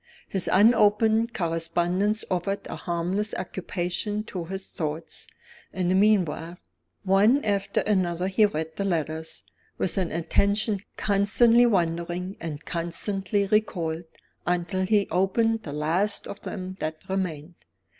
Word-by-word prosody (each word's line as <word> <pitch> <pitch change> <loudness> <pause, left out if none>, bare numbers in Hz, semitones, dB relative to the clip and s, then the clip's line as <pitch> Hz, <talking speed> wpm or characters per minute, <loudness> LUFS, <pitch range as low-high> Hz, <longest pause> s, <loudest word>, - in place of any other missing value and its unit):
His 190 -2 -1
unopened 220 +2 +4
correspondence 175 +4 0
offered 185 +2 -1
a - - -6
harmless 180 +5 -2
occupation 185 +3 -3
to 185 -5 -6
his 190 +2 -5
thoughts, 160 -1 -5 0.4
in 180 -2 -1
the - - +3
meanwhile. 180 -4 +2 0.5
One 205 +8 +4
after 200 -2 0
another 185 -3 0
he 210 +2 +4
read 160 -3 -5
the 200 - -1
letters, 160 -3 -3 0.3
with 190 - 0
an 180 -3 -1
attention 200 +5 +1 0.2
constantly 225 +4 +4
wandering 175 -1 -1
and 155 -2 -6
constantly 195 +4 -1
recalled, 175 -6 0 0.4
until 180 +2 0
he 205 -1 +3
opened 220 +6 +2
the 150 - -7
last 170 +8 0
of 200 - -8
them 185 -1 -6
that 155 0 -5
remained. 180 -4 -3
185 Hz, 125 wpm, -26 LUFS, 170-205 Hz, 0.5 s, unopened